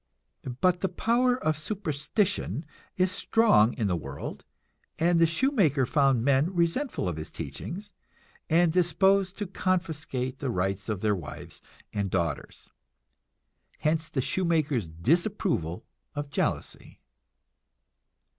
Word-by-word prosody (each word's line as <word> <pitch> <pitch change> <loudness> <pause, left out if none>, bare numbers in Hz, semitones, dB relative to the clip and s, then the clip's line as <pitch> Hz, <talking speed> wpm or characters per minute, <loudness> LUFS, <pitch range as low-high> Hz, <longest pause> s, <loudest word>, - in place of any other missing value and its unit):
But 180 -1 +3
the 190 - +1
power 245 +7 +2
of 155 0 +2
superstition 175 0 -1 0.3
is 185 0 +2
strong 185 - +4
in 115 - -1
the 95 -3 +1
world, 80 - -6 0.5
and 170 +1 +3
the 165 - +6
shoemaker 165 - +2
found 135 -3 +3
men 140 +6 +2
resentful 170 - 0
of 85 -3 -2
his 80 - -6
teachings, 205 +4 -7 0.6
and 165 0 +4
disposed 185 +2 +3
to 205 - -2
confiscate 160 -9 -2
the 135 - -2
rights 95 -1 -1
of 105 -3 -2
their 105 -1 +2
wives 75 -8 -9 0.3
and 100 -2 -1
daughters. 85 -6 -3 1.1
Hence 160 +1 0
the 130 - -1
shoemaker's 155 - 0
disapproval 125 - 0 0.3
of 145 -1 -4
jealousy. - - -3
160 Hz, 115 wpm, -28 LUFS, 120-185 Hz, 1.1 s, the